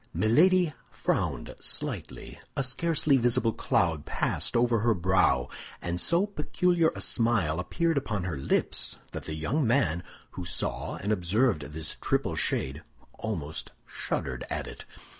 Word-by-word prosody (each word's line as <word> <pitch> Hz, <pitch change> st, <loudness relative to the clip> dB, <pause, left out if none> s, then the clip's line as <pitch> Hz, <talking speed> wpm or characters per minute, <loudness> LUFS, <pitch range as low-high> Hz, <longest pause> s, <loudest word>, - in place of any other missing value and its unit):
Milady 170 Hz, +8 st, +4 dB, 0.2 s
frowned -, -, -1 dB
slightly; -, -, -2 dB, 0.2 s
a 135 Hz, -, +2 dB
scarcely 145 Hz, +2 st, +2 dB
visible 115 Hz, -2 st, +2 dB
cloud 80 Hz, -4 st, +1 dB
passed -, -, 0 dB
over 120 Hz, -1 st, +3 dB
her 115 Hz, +1 st, +3 dB
brow, 90 Hz, -8 st, +3 dB, 0.3 s
and 85 Hz, 0 st, -2 dB
so 170 Hz, +4 st, +3 dB
peculiar 175 Hz, -2 st, +1 dB
a -, -, -5 dB
smile 110 Hz, -10 st, +1 dB
appeared 165 Hz, -, +1 dB
upon 105 Hz, -8 st, -3 dB
her 90 Hz, -4 st, -2 dB
lips 70 Hz, -, -1 dB
that -, -, -6 dB
the 80 Hz, -, -4 dB
young 120 Hz, -, 0 dB
man, 90 Hz, -, +2 dB, 0.3 s
who 90 Hz, -, -6 dB
saw 85 Hz, -, -2 dB
and 105 Hz, -, -2 dB
observed 105 Hz, 0 st, +2 dB
this 80 Hz, +1 st, -4 dB
triple -, -, 0 dB
shade, 70 Hz, +4 st, -1 dB, 0.4 s
almost 75 Hz, 0 st, -3 dB
shuddered 65 Hz, -2 st, -3 dB
at -, -, -2 dB
it. -, -, -9 dB
110 Hz, 140 wpm, -28 LUFS, -, 0.4 s, Milady